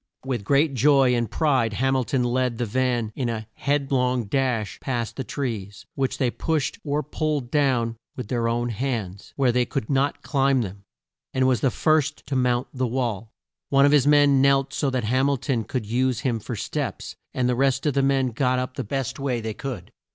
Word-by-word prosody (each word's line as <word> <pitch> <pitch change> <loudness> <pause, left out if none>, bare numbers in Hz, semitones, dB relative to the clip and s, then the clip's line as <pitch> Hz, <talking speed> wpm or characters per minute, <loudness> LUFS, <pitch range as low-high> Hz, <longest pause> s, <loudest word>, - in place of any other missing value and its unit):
With 125 -6 -2
great 140 +6 +2
joy 135 0 +4
and 120 -2 0
pride 130 -8 +1
Ham 135 +4 +1
il 130 - +2
ton 130 0 0
led 125 -1 0
the 120 - -1
van 120 -1 0
in 125 -3 -1
a 110 -1 -3
head 140 -1 -1
long 125 -2 +1
dash 115 -3 -1
past 120 -4 -3
the 135 - -3
trees, 105 -8 -5
which 135 -1 -1
they 125 -3 +1
pushed 160 - -1
or 150 0 -1
pulled 150 -6 -2
down 125 -6 +1 0.2
with 125 -5 -6
their 115 0 0
own 120 +1 0
hands, 110 -5 -4
where 135 -3 +3
they 125 +1 +2
could 125 0 -3
not 140 +1 0
climb 135 -3 +2
them, 100 0 -8 0.5
and 130 0 +3
was 130 -3 +2
the 135 - +3
first 155 +3 +1
to 135 - -3
mount 125 -1 +1
the 130 -1 -1
wall. 115 -4 -2 0.4
One 140 0 +5
of 145 - +4
his 145 -2 +4
men 145 -2 +5
knelt 135 0 +3
so 145 -1 0
that 130 -2 -1
Ham 130 +5 +2
il 140 - +1
ton 120 -4 -2
could 125 -5 -3
use 125 +2 0
him 120 -4 0
for 115 +3 -5
steps, - - -4 0.2
and 125 -1 0
the 125 - +2
rest 135 +2 +1
of 150 - +2
the 140 - +2
men 135 -1 +2
got 125 +2 +1
up 130 0 -3
the - - -2
best 135 +4 -3
way 135 -3 -1
they 110 -1 -4
could. 115 -4 -6
130 Hz, 210 wpm, -24 LUFS, 115-135 Hz, 0.5 s, One